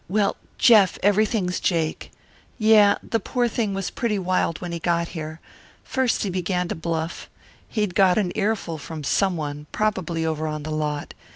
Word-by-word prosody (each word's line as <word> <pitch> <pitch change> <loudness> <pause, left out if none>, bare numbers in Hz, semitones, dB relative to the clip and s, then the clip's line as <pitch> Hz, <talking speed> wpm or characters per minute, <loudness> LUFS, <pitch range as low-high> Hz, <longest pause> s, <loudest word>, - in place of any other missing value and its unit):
Well, 205 +1 +1 0.2
Jeff, 210 -5 +6
everything's 205 -2 +2
jake. 165 -3 -1 0.5
Yeah. 215 -3 +5
The 225 - 0
poor 245 +4 0
thing 220 -3 -1
was 195 -1 -3
pretty 230 -5 -1
wild 185 -3 0
when 175 -1 -5
he 170 - -3
got 170 0 0
here. 160 -1 -6 0.4
First 260 -3 0
he 200 - -2
began 180 0 -1
to - - -1
bluff. 165 0 -4 0.4
He'd 210 -5 -1
got 185 -1 +4
an 195 -4 +1
earful 205 -6 -1
from 155 +1 -7
someone, 150 -4 -1
probably 185 -6 -1
over 160 0 -1
on 150 -1 -4
the 155 - -5
lot. 150 -1 -2
180 Hz, 165 wpm, -23 LUFS, 160-210 Hz, 0.5 s, Jeff